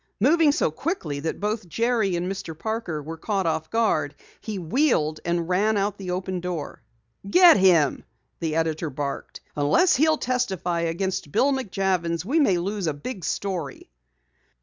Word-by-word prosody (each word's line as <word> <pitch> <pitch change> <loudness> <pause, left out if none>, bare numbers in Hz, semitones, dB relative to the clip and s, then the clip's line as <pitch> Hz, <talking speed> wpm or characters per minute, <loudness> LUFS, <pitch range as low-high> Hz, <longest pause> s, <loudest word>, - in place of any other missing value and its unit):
Moving 300 +6 +4
so 280 - +1
quickly 160 - -3
that 160 +3 -3
both 210 -2 -3
Jerry 225 -3 +1
and 175 +1 -2
Mr. 180 -4 -5
Parker 220 -8 -3
were 165 +2 -7
caught 195 0 -1
off 160 -1 -1
guard, 185 -11 +1 0.2
he 215 -2 -5
wheeled 170 - +1
and 170 -1 -1
ran 205 +4 +2
out 200 +1 -1
the 190 -2 -6
open 185 0 -2
door. 175 -4 -5 0.5
"Get 355 - +7
him!" 170 -8 +3 0.4
the 160 -2 -2
editor 160 0 -1
barked. 140 0 -5
"Unless 150 - +3
he'll 310 +2 +3
testify 195 - -1
against 170 0 -2
Bill 275 - +3
McJavins 185 -8 -1
we 290 +9 +1
may 200 - +3
lose 195 +1 -2
a 155 - -1
big 185 - -7
story!" 170 - -4
185 Hz, 155 wpm, -24 LUFS, 165-220 Hz, 0.5 s, Get